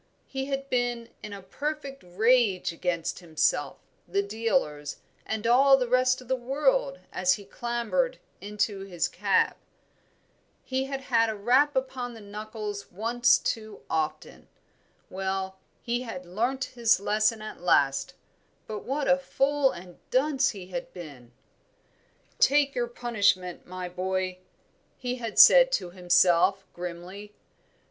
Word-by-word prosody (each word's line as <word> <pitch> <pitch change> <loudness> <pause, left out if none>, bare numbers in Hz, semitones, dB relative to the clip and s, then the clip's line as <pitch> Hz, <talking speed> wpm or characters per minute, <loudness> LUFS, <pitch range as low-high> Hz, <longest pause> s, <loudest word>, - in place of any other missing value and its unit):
He 265 0 -4
had 275 0 -3
been 245 -2 -1
in 210 - -8
a 200 -1 -8
perfect 280 +5 -5
rage 200 0 +2
against 170 0 -2
himself, 155 -3 0 0.3
the 195 +3 0
dealers, 200 - -1 0.3
and 220 0 -3
all 270 +3 +6
the 250 -2 -1
rest 255 +1 +2
of 255 - -14
the 260 - +1
world - - 0 0.2
as 275 - +3
he 205 - -11
clambered 240 - -1 0.2
into 205 0 -2
his 185 -4 -2
cab. 195 +1 +1 1.1
He 260 0 -1
had 270 0 -4
had 230 -3 +2
a 220 - -3
rap 260 +8 +3
upon 255 -2 -3
the - - -10
knuckles 210 -1 -7
once 240 +6 +3
too 220 -2 -4
often. 160 -1 -3 0.6
Well, 190 0 -3 0.2
he 240 +1 -1
had 205 -7 -7
learnt 240 +9 -1
his 235 -4 +3
lesson 215 +2 +1
at 215 - -8
last; 135 -6 +2 0.5
but 215 -1 -5
what 275 +2 -2
a 270 0 +4
fool 275 +1 +1
and 175 -5 -10
dunce 270 0 +2
he 185 -4 -8
had 260 +4 -5
been! 140 -9 -11 1.1
"Take 285 0 +4
your 240 -1 -1
punishment, 200 -7 0
my 185 0 -5
boy," 185 0 -2 0.6
he 250 0 -3
had 230 -3 -6
said - - +9
to 175 - -1
himself, 180 +1 +3
grimly. 180 +4 -8
220 Hz, 135 wpm, -27 LUFS, 185-260 Hz, 1.1 s, said